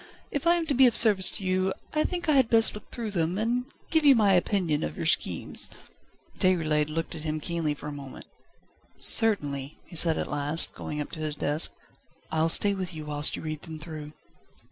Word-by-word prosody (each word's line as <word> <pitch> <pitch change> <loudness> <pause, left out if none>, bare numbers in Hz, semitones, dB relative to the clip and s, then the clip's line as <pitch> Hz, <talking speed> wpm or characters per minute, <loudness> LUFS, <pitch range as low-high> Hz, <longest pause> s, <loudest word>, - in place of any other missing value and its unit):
If 285 +3 -3
I 340 - +5
am 340 -1 -2
to 305 - -2
be 265 0 +5
of 235 - 0
service 205 -5 +5
to 200 - -4
you 185 +1 0 0.2
I 305 0 +1
think 350 -1 -4
I - - +3
had 265 -5 +3
best 225 -1 +3
look 210 - -11
through 230 -3 -6
them, 175 -1 -1
and 240 +3 -1 0.3
give 320 -1 +2
you 280 -2 +6
my 205 -4 +3
opinion 175 -4 0
of 75 0 -5
your - - -4
schemes." - - -1 0.7
Déroulède 155 -5 +1
looked 165 +1 -4
at 155 - -7
him 155 0 -3
keenly 160 -2 -2
for 145 - -12
a 150 - -5
moment. 140 -2 -10 0.7
"Certainly," 145 - +4
he - - -14
said 160 0 +1
at - - -2
last, 145 +2 0
going 150 - -7
up 145 - -7
to 160 - -8
his 155 -1 -2
desk. 150 +2 +3 0.6
"I'll 160 +1 +1
stay 200 +4 +5
with 185 -3 -5
you 155 -1 -8
whilst 150 0 0
you - - -8
read 155 -1 -5
them 160 -3 -9
through." 155 -1 -9
170 Hz, 210 wpm, -26 LUFS, 150-220 Hz, 0.7 s, you